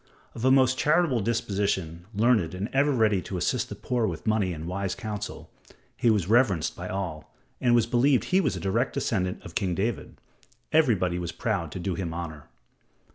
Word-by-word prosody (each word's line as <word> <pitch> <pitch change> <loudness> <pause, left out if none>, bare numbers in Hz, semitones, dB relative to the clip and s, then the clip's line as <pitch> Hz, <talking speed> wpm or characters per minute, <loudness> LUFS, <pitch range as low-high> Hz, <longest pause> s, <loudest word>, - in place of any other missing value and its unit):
Of 115 - -7
a 130 - +5
most 130 -1 +4
charitable 150 -4 +3
disposition, 95 -6 -1
learned 105 -5 +2
and 100 +5 -3
ever 140 +2 +3
ready 110 -7 +2
to 95 - -5
assist 85 - 0
the - - -6
poor 120 -3 -1
with 85 -5 -5
money 110 -4 +1
and 80 -2 -6
wise 95 +1 -2
counsel, 110 -5 -6 0.4
he 120 - +2
was 105 -6 +2
reverenced 110 -7 +2
by - - -6
all, 90 -5 -5 0.3
and 120 -1 +3
it - - +6
was 115 -2 +4
believed 125 +3 +3
he 190 +1 +2
was 140 -8 0
a - - -4
direct 115 +7 0
descendant 90 -4 -1
of - - -9
King 95 -7 -1
David. 110 +6 -3 0.5
Everybody 105 - +2
was 85 -1 -4
proud 90 -3 -2
to - - -5
do 95 +1 -2
him 85 -2 -4
honor. 80 -4 -6
105 Hz, 190 wpm, -27 LUFS, 90-120 Hz, 0.5 s, it